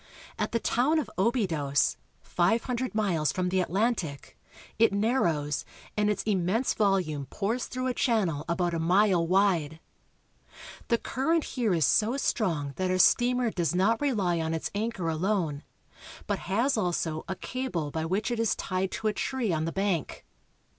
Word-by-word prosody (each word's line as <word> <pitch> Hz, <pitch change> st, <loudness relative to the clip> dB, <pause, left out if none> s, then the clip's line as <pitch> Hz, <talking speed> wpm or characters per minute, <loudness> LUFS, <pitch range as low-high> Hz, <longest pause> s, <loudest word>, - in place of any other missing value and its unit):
At -, -, -1 dB
the 230 Hz, -, +1 dB
town 265 Hz, +8 st, +1 dB
of 310 Hz, -, -2 dB
Obidos -, -, -7 dB
(o 220 Hz, +5 st, +4 dB
be^dos), 155 Hz, -, +1 dB, 0.3 s
five 185 Hz, +7 st, +1 dB
hundred 250 Hz, -2 st, -3 dB
miles 175 Hz, -8 st, +1 dB
from 180 Hz, -1 st, -1 dB
the 190 Hz, +1 st, +1 dB
Atlantic, 190 Hz, -, -2 dB, 0.4 s
it 225 Hz, -, +5 dB
narrows, 175 Hz, -, 0 dB, 0.3 s
and 210 Hz, 0 st, +2 dB
its 210 Hz, -2 st, -1 dB
immense 205 Hz, +4 st, +1 dB
volume 180 Hz, -9 st, 0 dB
pours 220 Hz, -, -2 dB
through 255 Hz, +1 st, -4 dB
a 255 Hz, -, 0 dB
channel 200 Hz, -, 0 dB
about 175 Hz, 0 st, 0 dB
a 165 Hz, -, -1 dB
mile 180 Hz, 0 st, +3 dB
wide. 175 Hz, -5 st, +2 dB, 1.1 s
The 235 Hz, -, +3 dB
current 305 Hz, +8 st, 0 dB
here 230 Hz, -8 st, 0 dB
is 160 Hz, -4 st, +3 dB
so 225 Hz, -, +2 dB
strong 165 Hz, -, -1 dB
that 185 Hz, 0 st, 0 dB
our 185 Hz, -, +1 dB
steamer 245 Hz, +4 st, +3 dB
does 170 Hz, -4 st, -1 dB
not 215 Hz, +7 st, +2 dB
rely 200 Hz, -12 st, +1 dB
on 160 Hz, 0 st, -1 dB
its 160 Hz, -, -4 dB
anchor 210 Hz, -4 st, -2 dB
alone, 165 Hz, -3 st, -1 dB, 0.6 s
but -, -, -1 dB
has 235 Hz, +7 st, +2 dB
also 170 Hz, -5 st, -1 dB
a 190 Hz, -, -3 dB
cable 190 Hz, -, -4 dB
by 160 Hz, +1 st, -2 dB
which 195 Hz, +8 st, -1 dB
it 240 Hz, -, -2 dB
is 230 Hz, -2 st, +1 dB
tied 185 Hz, 0 st, -2 dB
to 220 Hz, -, -2 dB
a 215 Hz, -, +1 dB
tree 235 Hz, -2 st, -1 dB
on 155 Hz, 0 st, -1 dB
the 165 Hz, -, -2 dB
bank. 195 Hz, -5 st, -2 dB
195 Hz, 170 wpm, -28 LUFS, 165-230 Hz, 1.1 s, it